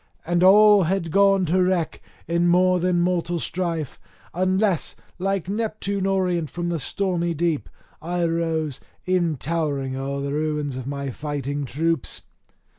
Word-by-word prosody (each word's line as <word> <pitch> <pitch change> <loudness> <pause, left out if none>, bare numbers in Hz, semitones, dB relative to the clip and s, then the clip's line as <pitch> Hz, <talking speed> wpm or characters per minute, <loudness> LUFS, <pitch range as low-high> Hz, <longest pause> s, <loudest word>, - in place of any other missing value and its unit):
And 175 +1 +1
all 205 0 +7
had 170 -1 -1
gone 195 0 +4
to 180 +3 +2
wreck 180 -3 0 0.3
in 170 +1 +2
more 180 +1 +4
than 175 0 +1
mortal 175 -1 0
strife, 165 -4 -3 0.3
unless, 185 0 +1 0.2
like 195 -1 -1
Neptune 200 -2 -2
orient 180 -5 0
from 175 0 -3
the 170 -2 -1
stormy 175 0 -1
deep, 165 -2 -1 0.3
I 175 +1 -1
rose, 165 -4 -1 0.3
e'en 175 -4 +1
towering 140 -3 -2
o'er 140 +1 -3
the 140 0 -3
ruins 150 -2 -1
of 130 0 -6
my 140 -1 -3
fighting 145 +1 -4
troops. 160 +2 -2
170 Hz, 140 wpm, -23 LUFS, 150-185 Hz, 0.3 s, all